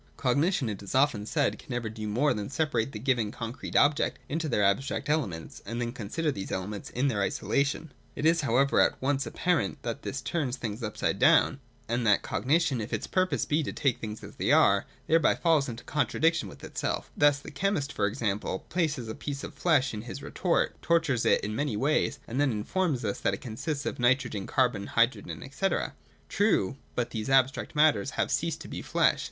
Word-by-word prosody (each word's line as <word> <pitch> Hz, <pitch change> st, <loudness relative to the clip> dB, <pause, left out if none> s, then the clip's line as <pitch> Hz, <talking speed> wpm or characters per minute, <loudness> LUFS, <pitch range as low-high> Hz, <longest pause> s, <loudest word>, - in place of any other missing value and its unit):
Cognition, 140 Hz, +3 st, +1 dB
it 105 Hz, -2 st, -4 dB
is 100 Hz, +5 st, -6 dB
often 130 Hz, -6 st, +2 dB
said, 145 Hz, +2 st, 0 dB
can -, -, -16 dB
never 120 Hz, -2 st, -2 dB
do 110 Hz, -1 st, -5 dB
more 125 Hz, +8 st, +2 dB
than 105 Hz, -1 st, -4 dB
separate 135 Hz, -5 st, 0 dB
the 110 Hz, -, -6 dB
given 120 Hz, -3 st, 0 dB
concrete 115 Hz, +3 st, -6 dB
objects 145 Hz, 0 st, +3 dB
into 160 Hz, +1 st, -2 dB
their 105 Hz, -5 st, +2 dB
abstract 135 Hz, +8 st, 0 dB
elements, 105 Hz, -, -2 dB
and 115 Hz, +4 st, -5 dB
then 120 Hz, -1 st, -2 dB
con 115 Hz, -5 st, -7 dB
sider 165 Hz, +2 st, 0 dB
these 95 Hz, -8 st, -6 dB
elements 100 Hz, +2 st, -4 dB
in 130 Hz, +3 st, 0 dB
their 110 Hz, -6 st, 0 dB
isolation. 140 Hz, +9 st, 0 dB, 0.2 s
It 150 Hz, -, -3 dB
is, 165 Hz, 0 st, +4 dB
however, 140 Hz, +1 st, +3 dB
at -, -, +2 dB
once 140 Hz, +1 st, 0 dB
apparent 175 Hz, -, 0 dB
that 120 Hz, +4 st, -4 dB
this 140 Hz, -, -4 dB
turns 135 Hz, -3 st, -2 dB
things 110 Hz, -1 st, -5 dB
upside 105 Hz, -2 st, -2 dB
down, 135 Hz, -, +5 dB, 0.3 s
and 120 Hz, +1 st, 0 dB
that 105 Hz, -, +4 dB
cognition, 140 Hz, -, +1 dB
if 110 Hz, -, -6 dB
its -, -, -2 dB
purpose 185 Hz, 0 st, 0 dB
be 150 Hz, +2 st, +1 dB
to 145 Hz, -, -3 dB
take 135 Hz, -4 st, 0 dB
things 110 Hz, -1 st, -6 dB
as -, -, -11 dB
they -, -, +1 dB
are, -, -, +5 dB, 0.2 s
thereby 165 Hz, +1 st, +4 dB
falls 155 Hz, -5 st, +2 dB
into 115 Hz, 0 st, -7 dB
contradiction 150 Hz, -, +1 dB
with -, -, -14 dB
itself -, -, -3 dB
Thus 145 Hz, -1 st, +4 dB
the 145 Hz, -, -10 dB
chemist 180 Hz, -8 st, -1 dB
e.g. 105 Hz, -1 st, 0 dB, 0.3 s
places 155 Hz, -8 st, -1 dB
a 110 Hz, -, -4 dB
piece 140 Hz, +2 st, -5 dB
of -, -, -6 dB
flesh 145 Hz, -7 st, +2 dB
in 105 Hz, -, -4 dB
his 125 Hz, +5 st, -8 dB
retort, 180 Hz, -2 st, 0 dB
tortures 165 Hz, -8 st, +2 dB
it -, -, +4 dB
in 105 Hz, +1 st, -3 dB
many 120 Hz, -3 st, -1 dB
ways, 145 Hz, +6 st, +1 dB
and 130 Hz, +5 st, -1 dB
then 145 Hz, -, +3 dB
informs 130 Hz, -, -1 dB
us 100 Hz, -, -2 dB
that -, -, +1 dB
it -, -, -13 dB
consists 140 Hz, +5 st, -4 dB
of -, -, -3 dB
nitrogen, 120 Hz, -5 st, +1 dB
carbon, 120 Hz, -7 st, +1 dB
hydrogen, 115 Hz, +3 st, 0 dB
&c. 195 Hz, +7 st, 0 dB, 0.6 s
True: 195 Hz, -, +1 dB, 0.2 s
but 120 Hz, -1 st, -1 dB
these 110 Hz, +1 st, -3 dB
abstract 135 Hz, +3 st, +2 dB
matters 150 Hz, -10 st, +4 dB
have -, -, 0 dB
ceased -, -, -1 dB
to -, -, -8 dB
be -, -, -6 dB
flesh. -, -, +2 dB
130 Hz, 200 wpm, -28 LUFS, 110-150 Hz, 0.6 s, down